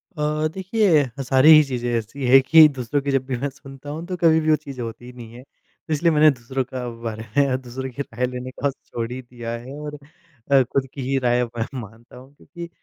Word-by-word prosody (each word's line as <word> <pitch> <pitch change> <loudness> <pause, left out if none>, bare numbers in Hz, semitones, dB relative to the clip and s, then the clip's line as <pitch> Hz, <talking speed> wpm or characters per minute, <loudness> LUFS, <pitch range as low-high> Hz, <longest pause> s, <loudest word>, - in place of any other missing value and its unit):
अ, 150 0 0
देखिए 190 -4 +2 0.2
सारी 130 +3 +4
ही 155 -1 +9
चीज़ें 125 -3 -3
ऐसी 115 +5 -5
हैं 135 +2 +7
कि 160 +4 +7
दूसरों 130 +3 -1
की 140 0 -2
जब 135 -1 0
भी 130 -2 -3
मैं 140 +4 -2
सुनता 135 +1 -12
हूँ 160 +3 -6
तो 185 - -3
कभी 165 -2 +4
भी 155 0 -1
वो 155 - +6
चीज़ 140 -3 -10
होती 115 +1 -7
ही 125 - -10
नहीं 115 -2 -11
है। 125 +1 -12
तो 155 +3 -10
इसलिए 165 +3 +2
मैंने 155 0 +6
दूसरों 130 +1 -4
का 125 0 -6
बारे 110 -1 -5
में 140 -2 +3
दूसरों 130 +1 -6
की 140 - -6
राय 125 -2 -3
लेने 125 0 -6
को 140 0 0
छोड़ 120 -3 -7
ही 130 +1 -5
दिया 120 -2 -8
है 120 +3 -7
और 150 0 -7 0.5
अ, 135 -1 +6
खुद 135 +2 -2
की 140 - -6
ही 135 - +1
राय 120 0 +2
अब 120 -2 -3
मैं 115 - -1
मानता 115 +2 -12
हूँ 130 +2 -15
क्योंकि 170 +3 -10
135 Hz, 240 wpm, -22 LUFS, 120-150 Hz, 0.5 s, ही